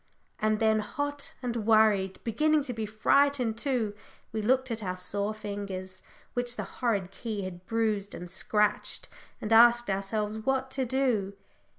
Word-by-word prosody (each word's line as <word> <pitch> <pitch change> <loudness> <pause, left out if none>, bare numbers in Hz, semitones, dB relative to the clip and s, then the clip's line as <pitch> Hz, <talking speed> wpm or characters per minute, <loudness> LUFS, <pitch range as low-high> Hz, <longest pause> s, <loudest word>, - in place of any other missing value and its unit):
And 215 0 +1
then, 220 -1 +3
hot 285 +7 -4
and 240 -1 -2
worried, 215 -3 +3
beginning 305 +6 +2
to 255 -3 -4
be 220 -2 -3
frightened 245 +2 +2
too, 230 -4 0 0.4
we 220 - -2
looked 260 +3 +2
at 225 -1 -2
our 185 -2 -3
sore 200 +3 -1
fingers, 200 -3 -6 0.3
which 245 0 -2
the - - -3 0.2
horrid 200 -7 0
key 210 0 -4
had 185 -1 -8
bruised 215 -3 0
and 180 - -7
scratched, 210 +3 0 0.3
and 215 +1 -1
asked 240 -1 +6
ourselves 210 +2 -2
what 265 +3 -1
to 265 -1 -1
do. 235 -6 +1
220 Hz, 155 wpm, -29 LUFS, 200-245 Hz, 0.4 s, asked